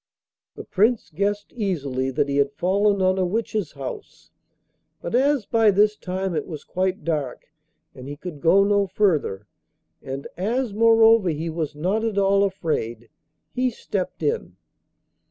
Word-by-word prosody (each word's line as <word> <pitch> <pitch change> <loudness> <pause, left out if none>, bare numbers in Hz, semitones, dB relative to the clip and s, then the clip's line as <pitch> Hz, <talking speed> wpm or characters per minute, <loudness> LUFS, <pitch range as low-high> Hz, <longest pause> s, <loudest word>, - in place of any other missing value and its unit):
The - - -8
Prince 220 +4 +1
guessed 200 +5 -2
easily 140 - -2
that 135 +2 0
he 140 0 -1
had 140 0 +2
fallen 200 +4 +1
on 185 0 +2
a - - +2
witch's 205 -2 -2
house, 135 -3 -8 0.7
but 170 - -6
as 270 -1 +2
by 225 -1 +3
this 210 +2 +3
time 190 -1 -3
it 155 - -2
was 155 -4 -7
quite 185 -1 -2
dark 150 -3 -3 0.4
and 130 -1 -10
he 145 +1 -7
could 155 -3 -8
go 195 +4 +5
no 200 0 +2
further, 155 - 0 0.6
and 135 +1 -6
as 225 +4 -1
moreover 225 -2 +5
he 160 +1 -3
was 155 -2 -3
not 190 +9 -1
at 225 -3 -2
all 200 0 +3
afraid, 120 - -2 0.4
he 255 0 +1
stepped 195 -5 -4
in. 455 +2 -1
190 Hz, 155 wpm, -23 LUFS, 150-210 Hz, 0.7 s, go